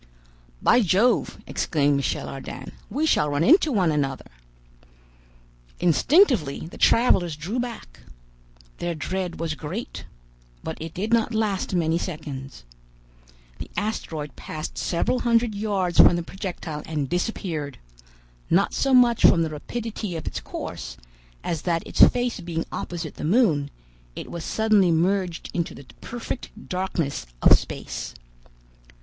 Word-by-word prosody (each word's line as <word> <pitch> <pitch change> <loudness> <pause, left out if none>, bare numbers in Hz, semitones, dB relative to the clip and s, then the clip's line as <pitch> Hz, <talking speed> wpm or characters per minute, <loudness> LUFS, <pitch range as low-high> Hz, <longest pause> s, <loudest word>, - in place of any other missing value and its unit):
"By 245 - +5
Jove!" 205 +5 +2
exclaimed 145 -3 +1
Michel 140 - -2
Ardan, 135 - -7 0.2
"we 290 +9 0
shall 150 - +3
run 145 +2 +1
into 320 - +5
one 185 -8 +2
another!" 135 - -2 1.5
Instinctively 180 - +3
the 165 - -11
travelers 180 -9 +4
drew 180 +11 -3
back. 235 - -6 0.8
Their 175 -1 -2
dread 180 +3 -3
was 165 -2 -1
great, 165 +10 -6 0.6
but 160 - -4
it 160 0 -7
did 210 +5 -1
not 230 0 +2
last 205 -4 0
many 165 -1 +1
seconds. 140 - -6 1.0
The - - -7
asteroid 160 - -3
passed 155 0 -6
several 245 +9 0
hundred 235 -2 +2
yards 200 -4 -1
from - - +8
the 175 - -2
projectile 175 -4 -6
and 150 -4 -2
disappeared, 165 - -3 0.7
not 195 +3 +3
so 270 -1 +2
much 240 -2 +5
from 165 - +6
the 160 - -2
rapidity 215 +4 -5
of 160 - -5
its - - -3
course, 65 - -7 0.5
as 165 -3 -2
that 170 -2 -1
its - - -2
face 245 -2 -2
being 170 -2 -3
opposite 170 -3 -5
the - - -6
moon, 160 - +3 0.5
it - - -7
was 170 -1 -5
suddenly 215 -3 +3
merged 175 +1 0
into 170 -1 -2
the 140 - -12 0.2
perfect 235 -1 -7
darkness 180 - -2 0.2
of - - +9
space. - - -4
175 Hz, 135 wpm, -24 LUFS, 155-220 Hz, 1.5 s, of